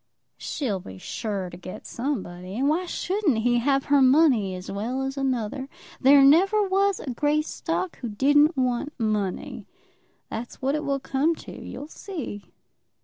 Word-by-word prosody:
"She'll 230 -10 -2
be 95 - -10
sure 195 - -4
to 175 - -9
get 185 +1 -9
somebody, 190 -8 -4
and 270 +3 +1
why 340 +5 +1
shouldn't 365 - 0
he 240 +2 +2
have 275 +2 +1
her 285 -1 +4
money 260 - +4
as 180 0 -7
well 235 +7 -2
as 270 0 -3
another? 265 0 -2 0.3
There 275 +1 +7
never 385 +9 +5
was 390 +1 +2
a 265 - -5
Greystock 305 +6 -1
who 240 - -4
didn't 290 +8 +4
want 255 +3 -1
money. 210 -2 -2 0.6
That's 235 +2 -6
what 270 +1 0
it 305 0 -1
will 280 -1 0
come 280 +5 +1
to; - - -8
you'll - - -8
see." 305 - -7
270 Hz, 155 wpm, -25 LUFS, 220-300 Hz, 0.6 s, There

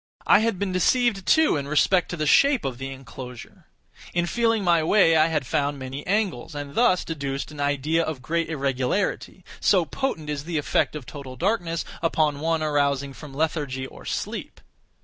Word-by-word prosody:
I 205 - +6
had 225 -3 0
been 200 0 -2
deceived, 195 +2 +2
too, 315 - +4
in 140 -1 -4
respect 165 +4 +2
to 175 - -4
the 155 - -1
shape 275 - +4
of 130 -2 -3
the 135 0 -4
enclosure. 130 -2 -10 0.5
In 175 0 +2
feeling 225 +2 +1
my 170 -3 +4
way 165 -1 +4
I 155 0 +5
had 155 -5 -1
found 140 +3 0
many 135 +2 -7
angles, 185 - -1
and 145 -1 -6
thus 230 -7 +3
deduced 140 -3 -4
an 150 - -11
idea 145 +3 +1
of 155 -6 -4
great 165 +4 -1
irregularity; 140 +6 -2
so 185 -4 +3
potent 215 - -3
is 145 -1 -4
the 170 -1 -2
effect 150 - 0
of 145 -4 -6
total 130 0 -9
darkness 175 - -1 0.2
upon 155 -3 +1
one 160 +1 0
arousing 140 -2 0
from 140 -1 -11
lethargy 145 -4 -1
or - - -12
sleep! - - -5
155 Hz, 180 wpm, -24 LUFS, 140-180 Hz, 0.5 s, I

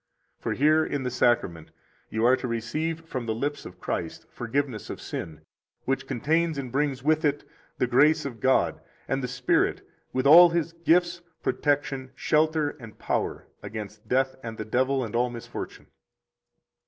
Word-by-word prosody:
For - - -2
here 155 +3 +4
in 145 -3 -2
the 125 - -2
Sacrament 95 -10 +1 0.4
you 110 +1 0
are 125 +2 +6
to 125 - -4
receive 150 +8 -2
from 130 -7 -5
the 110 - 0
lips 145 +5 -3
of 90 0 -14
Christ 85 -2 -4
forgiveness 125 -1 -3
of - - -6
sin, 80 -2 -6 0.4
which 135 +1 -1
contains 160 +5 0
and 130 -3 -4
brings 135 -1 0
with 155 +1 +2
it 145 -1 0 0.3
the - - +2
grace 140 +6 +4
of 120 -5 -6
God 130 +2 +2 0.3
and 135 0 0
the 125 - -2
Spirit 125 0 0 0.2
with 130 +1 -1
all 170 +5 +10
His 170 -1 -1
gifts, 170 +1 +2 0.2
protection, 140 -2 0
shelter, 155 -1 +2
and 115 -3 -11
power - - -2 0.2
against 105 0 -8
death 130 +1 +1
and 115 -2 -7
the 110 - -5
devil 130 +4 +1
and 115 -1 -5
all 125 +1 +2
misfortune. 120 -1 -7
130 Hz, 165 wpm, -26 LUFS, 120-150 Hz, 0.4 s, all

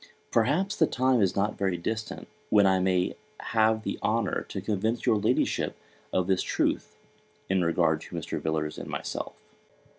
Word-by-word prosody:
Perhaps 155 - +2
the 160 - +4
time 130 -2 +2
is 95 - +2
not 100 +2 0
very 95 -3 +1
distant, 110 +5 -4 0.2
when 105 -2 +5
I 95 -1 +4
may 90 -1 +1 0.4
have 110 0 +3
the - - -3
honour 110 -2 0
to 100 - -4
convince 110 +4 -1
your 110 - +4
Ladyship 105 - +1 0.4
of 95 - +1
this 95 0 +2
truth, - - -1 0.5
in 95 -1 +2
regard 85 0 +2
to - - -9
Mr. - - -4
Villars 80 -1 -2
and - - -7
myself. - - -4
100 Hz, 160 wpm, -28 LUFS, 95-110 Hz, 0.5 s, when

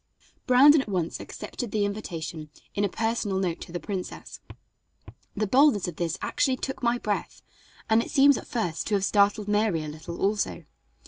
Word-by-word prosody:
Brandon 275 +4 +7
at 245 - -8
once 175 -4 -2
accepted 245 - -6
the 205 -1 0
invitation 165 -6 -5 0.2
in 205 - -1
a 200 - +1
personal 225 -2 -1
note 180 -3 -2
to - - -9
the 175 - -4
princess. 190 -2 -6 1.0
The 215 - +1
boldness 255 -2 +4
of 175 - -6
this 170 -2 -2
actually 280 -3 +1
took 265 0 -5
my 240 0 +2
breath, 210 -4 -4 0.4
and 220 +1 +4
it - - -6
seems 280 0 +5
at - - -7
first 175 -9 -2
to 210 - +1
have 195 -1 +1
startled 205 0 +2
Mary 210 -6 +1
a - - -6
little, 160 +3 -8
also. 205 +1 -1
205 Hz, 180 wpm, -26 LUFS, 175-235 Hz, 1.0 s, Brandon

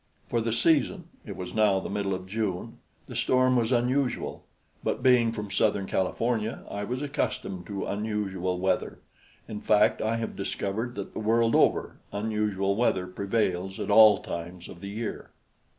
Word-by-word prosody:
For 120 - +1
the 115 0 -1
season 160 - +2 0.2
it 100 - -6
was 90 +1 -6
now 105 -3 +3
the - - -5
middle 100 -1 -1
of 95 0 -7
June 95 -2 -3 0.3
the - - -9
storm 130 0 +3
was 120 -1 +1
unusual; 125 +2 0 0.4
but - - -2
being 125 -3 +5
from 105 -3 -5
southern 100 -2 +1
California, 110 +4 -1
I 100 0 -3
was 125 +5 -3
accustomed 120 - -3
to 100 -2 -4
unusual 100 -3 -2
weather. 95 +1 0 0.5
In 105 -1 -6
fact, 105 0 +3
I 110 +1 0
have 115 -1 -3
discovered 105 +4 -3
that 100 - -6
the - - -4
world 115 +1 +2
over, - - +2
unusual 100 -2 0
weather 100 -5 +1
prevails 95 0 -1
at 105 0 -2
all 110 -1 +7
times 85 +1 -6
of 85 - -11
the 100 - -6
year. 110 +2 -5
105 Hz, 165 wpm, -27 LUFS, 95-115 Hz, 0.5 s, all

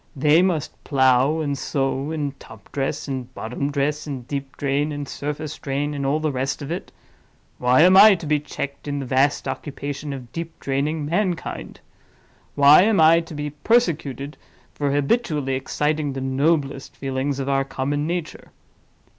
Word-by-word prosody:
They 150 +4 +4
must 175 -6 -1
plow, 130 +3 +3
and 145 -2 -1
sow, 135 +1 -2
and 145 -3 -3
top 110 -2 -14
dress, 135 +1 -2
and 130 -2 -4
bottom 125 +6 -3
dress, 145 +2 -1
and 130 -4 -6
deep 140 -1 -5
drain, 145 +2 0
and 145 -1 -5
surface 150 +2 -5
drain, 145 +2 -2
and 140 -1 -2
all 145 +3 +1
the 155 -1 0
rest 135 +2 -2
of 140 - -6
it. 175 - -5 0.7
Why 125 +3 +4
am 185 +3 +7
I 205 +1 +9
to 170 - -8
be 150 0 +2
checked 140 -1 -6
in 145 0 -2
the 140 - -3
vast 135 +3 +1
occupation 145 +1 -5
of 125 -3 -8
deep 165 +2 -6
draining 145 +3 -1
mankind? 175 +2 -2 0.7
Why 145 +3 +8
am 205 -1 +3
I 160 +1 +7
to 165 -2 -8
be 150 0 -4
persecuted 150 - 0 0.4
for 145 -1 -1
habitually 145 - 0
exciting 150 +2 -1
the 135 - -4
noblest 135 +1 0
feelings 135 +1 -2
of 135 -1 -3
our 135 0 +2
common 145 +2 -2
nature? 175 -1 -4
145 Hz, 165 wpm, -22 LUFS, 135-155 Hz, 0.7 s, I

